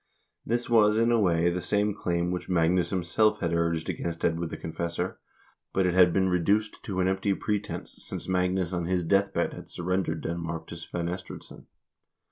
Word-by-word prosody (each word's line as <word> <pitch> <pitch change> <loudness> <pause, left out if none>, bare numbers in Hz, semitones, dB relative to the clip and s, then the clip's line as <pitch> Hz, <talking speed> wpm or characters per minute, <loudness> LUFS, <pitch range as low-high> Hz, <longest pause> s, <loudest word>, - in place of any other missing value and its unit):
This 120 +2 -1
was, 110 -2 +5
in 115 +1 +3
a 120 - +4
way, 85 -3 +3
the 90 +1 -2
same 105 +2 +1
claim 85 -3 -1
which 90 +1 -4
Magnus 85 0 +2
himself 105 +4 +2
had 85 -2 -1
urged 85 -1 0
against 85 -1 -3
Edward 85 0 0
the - - -6
Confessor, 85 +2 -3 0.5
but 95 - +2
it 90 - +2
had 90 -1 +6
been 95 +2 +2
reduced 100 +4 +1
to 95 -2 -1
an 90 - +2
empty 95 +1 +1
pretense, 105 0 -4
since - - -6
Magnus 90 -1 0
on 85 -1 -1
his 90 0 0
death 100 +4 +2
bed - - 0
had - - -10
surrendered 90 +1 -1
Denmark 85 0 -4
to - - -8
Svein 85 0 -4
Estridsson. 90 +1 -7
90 Hz, 185 wpm, -28 LUFS, 85-100 Hz, 0.5 s, had